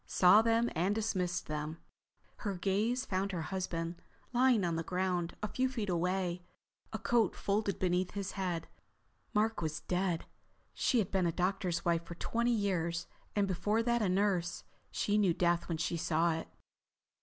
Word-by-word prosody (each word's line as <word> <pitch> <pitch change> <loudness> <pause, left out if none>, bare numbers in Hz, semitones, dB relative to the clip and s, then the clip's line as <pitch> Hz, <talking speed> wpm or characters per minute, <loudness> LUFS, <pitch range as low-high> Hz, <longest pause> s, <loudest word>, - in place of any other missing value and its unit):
Saw 190 +4 +6
them 230 +1 +3
and 185 +6 +1
dismissed 185 -5 -1
them. 150 +1 -4 0.6
Her 200 -3 -3
gaze 210 +8 0
found 195 -1 -1
her 170 -3 -2
husband, 170 -1 -3 0.3
lying 245 -4 +4
on 170 -1 0
the 165 - -1
ground 180 -1 -1
a - - +1
few 260 +4 0
feet 225 -6 -3
away, 180 0 0 0.5
a - - -2
coat 235 -2 +2
folded 200 0 0
beneath 180 0 0
his 200 -1 -3
head. 180 -4 -2 0.6
Mark 220 0 +1
was 155 -2 -2
dead. 180 -2 -1 0.5
She 255 - +1
had 210 -6 +1
been 190 -3 +2
a - - +1
doctor's 180 0 -1
wife 170 -1 +2
for 170 - -8
twenty 235 +7 0
years, 175 -6 0 0.3
and 205 -1 +2
before 210 +4 +1
that 235 0 +2
a 200 - +2
nurse. 180 -2 +1 0.3
She 210 +1 +1
knew 185 -5 +3
death 175 0 +1
when 165 - -1
she 170 +1 -1
saw 165 +1 +2
it. 160 - -4
185 Hz, 165 wpm, -33 LUFS, 170-210 Hz, 0.6 s, Saw